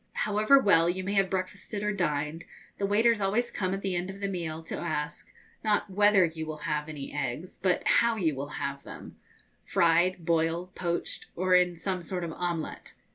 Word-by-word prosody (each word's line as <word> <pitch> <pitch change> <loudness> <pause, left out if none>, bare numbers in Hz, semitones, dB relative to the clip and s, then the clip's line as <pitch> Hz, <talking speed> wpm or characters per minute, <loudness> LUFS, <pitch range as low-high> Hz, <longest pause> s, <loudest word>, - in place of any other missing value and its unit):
However 215 +6 +4
well 170 -9 +4
you 185 +1 -2
may 195 +2 -2
have 195 -2 +3
breakfasted 195 +2 -3
or 210 0 0
dined, 155 -3 -2 0.3
the 200 - +1
waiters 220 +2 +3
always 215 +5 +1
come 185 -2 -1
at 195 +1 -3
the 190 -2 -1
end 175 +2 -2
of 195 +1 -8
the 200 - -1
meal 165 -4 -4
to - - -5
ask, 150 -3 -3 0.3
not 210 -2 +1
whether 205 -1 +5
you 160 -1 -5
will 155 -1 -5
have 150 -1 -1
any 145 -3 -7
eggs, 145 +4 -4
but 185 -1 +1
how 235 -1 +4
you 170 -8 +1
will 140 +1 -4
have 140 0 -3
them - - -11 0.5
fried, 170 +1 +2
boiled, 170 +2 0
poached, 170 -1 -3
or 185 +1 +1
in 180 -1 +4
some 180 +2 -3
sort 180 +1 -3
of 165 - -3
omelette. 170 -2 -4
180 Hz, 190 wpm, -28 LUFS, 160-195 Hz, 0.5 s, whether